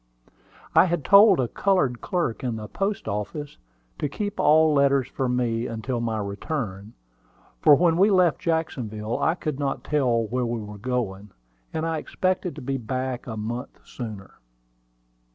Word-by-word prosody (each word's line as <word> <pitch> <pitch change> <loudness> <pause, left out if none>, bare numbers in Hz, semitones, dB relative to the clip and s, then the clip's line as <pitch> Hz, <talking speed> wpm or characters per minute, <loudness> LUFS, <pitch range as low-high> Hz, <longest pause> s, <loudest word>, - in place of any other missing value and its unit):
I - - +7
had 175 -5 -2
told 200 -2 +7
a 125 - +1
colored 160 - +1
clerk 170 - -2
in 120 -3 -1
the 110 -1 -6
post 195 - -3
office 105 - -4 0.4
to 145 - -1
keep 205 +7 -4
all 155 +1 +5
letters 140 -2 +3
for 130 -2 -2
me 120 -1 0
until 115 +2 -3
my 115 -1 -1
return, 100 0 -4 0.7
for 145 - +7
when 165 +2 +3
we 195 +4 +5
left 180 -7 +3
Jacksonville 120 -10 -2
I 160 - +2
could 150 -5 -4
not 140 -1 -2
tell 125 -6 +1
where 125 +3 -2
we 115 0 -2
were 105 -1 -8
going, 105 -4 -3 0.4
and 160 0 -2
I 165 -1 -1
expected 185 +2 -2
to - - -9
be 135 +1 -1
back 130 +1 -4
a 110 -2 -5
month 120 +5 -5
sooner. 110 -6 -8
130 Hz, 160 wpm, -25 LUFS, 115-160 Hz, 0.7 s, I